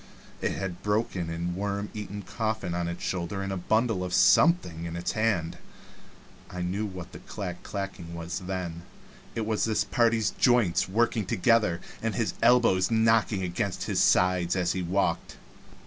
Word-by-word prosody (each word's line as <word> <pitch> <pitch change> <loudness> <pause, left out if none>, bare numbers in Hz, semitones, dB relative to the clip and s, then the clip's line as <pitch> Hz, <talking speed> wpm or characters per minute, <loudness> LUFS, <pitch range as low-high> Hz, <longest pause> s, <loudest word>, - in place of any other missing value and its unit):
It - - 0
had 95 -2 -3
a 85 - -13
broken 105 -5 -1
and 85 +1 -3
worm 100 +1 -2
eaten 105 -1 -6
coffin 110 -5 -2
on 85 0 -1
its 85 0 -5
shoulder 95 +2 -2
and 95 0 -3
a - - -2
bundle 110 +1 +1
of 90 -1 -2
something 95 - +4
in 85 0 -5
its 85 +1 -2
hand. 105 -7 0 0.9
I 90 -1 -5
knew 100 +4 -2
what 90 -2 -8
the - - -10
clack 90 -4 -6
clacking 95 -4 -6
was 85 +2 -4
then; 90 -3 -4 0.5
it 115 -2 -1
was 110 -1 0
this 110 -1 +1
party's 115 -3 +2
joints 120 -9 +2
working 110 0 +1
together, 105 -4 +2 0.2
and 115 -1 -1
his 115 -3 0
elbows 115 -6 +4
knocking 110 -3 +3
against 90 +2 -2
his - - 0
sides 90 -1 +3
as 90 -1 +1
he 95 - -2
walked. 90 -1 -1
95 Hz, 165 wpm, -27 LUFS, 90-110 Hz, 0.9 s, something